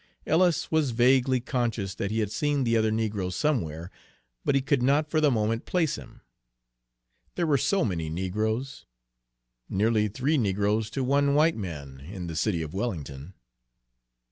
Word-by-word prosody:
Ellis 170 +1 +2
was 160 -3 +2
vaguely 130 +1 +4
conscious 115 -6 -2
that 100 - -3
he 110 +1 0
had 105 -1 -2
seen 145 +4 0
the 115 -1 +1
other 110 -1 +3
negro 105 -4 -1
somewhere, 90 - -1 0.5
but - - +1
he 135 - +3
could 140 -2 +1
not 145 +4 +2
for 155 - +2
the 150 - +5
moment 115 -1 0
place 165 -5 +1
him, - - -12 1.1
there 175 - 0
were 150 -3 +3
so 195 0 +2
many 85 -6 -2
negroes, 110 - -3 0.8
nearly 105 +2 +2
three 135 +8 0
negroes 105 +1 0
to 135 +3 -2
one 140 +2 +2
white 160 +2 +4
man 75 -10 -7
in 90 +6 -7
the 85 -1 -5
city 85 -1 0
of 75 - -7
Wellington! 85 - -5
110 Hz, 160 wpm, -27 LUFS, 95-140 Hz, 1.1 s, the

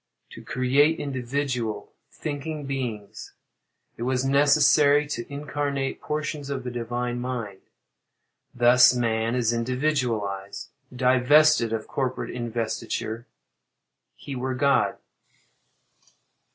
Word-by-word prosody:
To - - -10
create 140 +5 +2
individual, 125 -5 -3 0.2
thinking 150 0 -5
beings, 120 -7 -5 0.6
it - - -10
was 130 +1 0
necessary 145 +1 +4
to 130 -3 -6
incarnate 140 -1 -3
portions 150 -1 -4
of 135 -2 -3
the 125 - -5
divine 120 +1 -3
mind. 120 -6 -4 0.9
Thus 125 +1 +6
man 115 -1 0
is 120 -2 +1
individualized. 115 -6 -2 0.2
Divested 130 +1 +4
of 110 -1 -3
corporate 130 -2 -3
investiture, 115 -1 -4 0.9
he 140 - -8
were 130 +1 -2
God. 140 +2 +2
125 Hz, 95 wpm, -25 LUFS, 120-140 Hz, 0.9 s, Thus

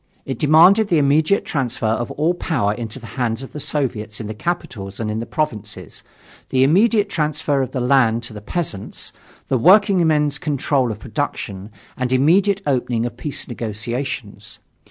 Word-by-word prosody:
It 130 -3 -4
demanded 175 +8 +6
the 170 - +2
immediate 155 +6 +3
transfer 125 -5 -2
of 115 +2 0
all 160 +4 0
power 135 - -1
into 115 0 -6
the 120 - -11 0.2
hands 115 +1 -1
of 135 - -10
the 150 - -7
Soviets 130 -8 -2
in 110 - -5
the 110 - -5
capitals 105 - -4
and 110 -2 -2
in 110 - -2
the 115 - -5
provinces, 105 - -4 0.5
the 130 0 +3
immediate 205 - +4
transfer 150 -5 0
of 130 - -2
the 130 - -2
land 120 -3 +3
to 120 - -5
the 105 - -8
peasants, 110 - -4 0.3
the 130 - +1
workingmen's 160 - +4
control 140 -4 0
of 105 - -5
production, 100 -1 -4 0.3
and 125 0 -2
immediate 190 +9 +3
opening 125 -4 0
of 120 - -5
peace 135 +1 -4
negotiations. 115 -2 -5
130 Hz, 165 wpm, -20 LUFS, 115-155 Hz, 0.5 s, demanded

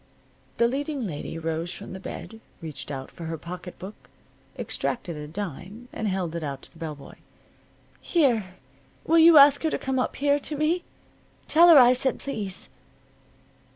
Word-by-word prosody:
The 235 - +4
leading 280 0 -3
lady 165 -2 -5
rose 165 +1 -3
from - - -8
the 190 - -7
bed, 220 +3 -8 0.2
reached 145 -5 -7
out 135 -2 -6
for 170 - -9
her 165 0 -4
pocket 180 +3 -8
book, 190 +3 -8 0.6
extracted 175 -9 -3
a 150 0 -7
dime, 200 - -7
and 220 - -3
held 185 -4 -2
it 170 - -3
out 140 -2 -5
to - - -15
the 165 - -18
bell 160 -2 -5
boy. 140 - -14 0.8
"Here. 260 - +2 0.6
Will 330 +1 +4
you 325 -1 +8
ask 285 0 +8
her 320 - +1
to - - -1
come 265 -1 -2
up 250 - -1
here 285 +1 +2
to 295 +1 -5
me? 320 +4 +1 0.6
Tell 340 +2 +6
her 330 - +9
I 250 -1 +8
said 255 +1 0
please." 205 -9 -5
210 Hz, 175 wpm, -26 LUFS, -, 0.8 s, her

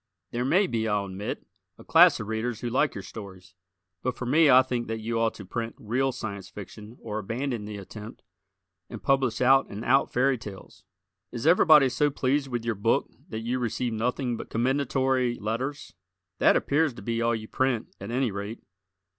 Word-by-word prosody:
There 120 +1 -1
may 185 +10 +3
be, 115 -8 -1
I'll 105 -2 0
admit, 95 +2 -5 0.3
a - - -13
class - - +6
of 110 - -4
Readers 110 +1 -3
who 120 - -2
like 145 +4 +1
your 100 - -6
stories, 95 -4 -10 0.5
but 125 -1 -2
for 125 - -4
me 150 +4 +5
I 130 0 +8
think 125 -2 -3
that 115 0 -3
you 115 +1 -2
ought 115 0 +1
to 100 - -9
print 115 +4 -4
real 130 +5 0
Science 100 -5 -6
Fiction 105 +3 -10
or 110 -1 -3
abandon 115 +2 -3
the 105 0 -6
attempt 105 +3 -10 0.7
and - - -9
publish 135 -4 +1
out 135 +2 +5
and 105 +3 -7
out 135 +3 +3
fairy 130 0 +2
tales. 100 -3 -11 0.5
Is 120 +1 -5
everybody 155 -4 +7
so 145 +3 +1
pleased 140 +1 0
with 120 -3 -4
your 115 - +1
book 100 -1 0 0.2
that 110 - -4
you 120 +3 -2
receive 120 0 -2
nothing 120 +2 -1
but - - -8
commendatory 130 0 +1
letters? 120 +7 -4 0.5
That - - +5
appears 145 -2 +1
to 105 - -10
be 115 +1 -1
all 115 0 +2
you 110 -1 -6
print, 130 -3 -1
at 100 - -7
any 125 -1 0
rate. 100 +3 -6
120 Hz, 190 wpm, -27 LUFS, 110-130 Hz, 0.7 s, I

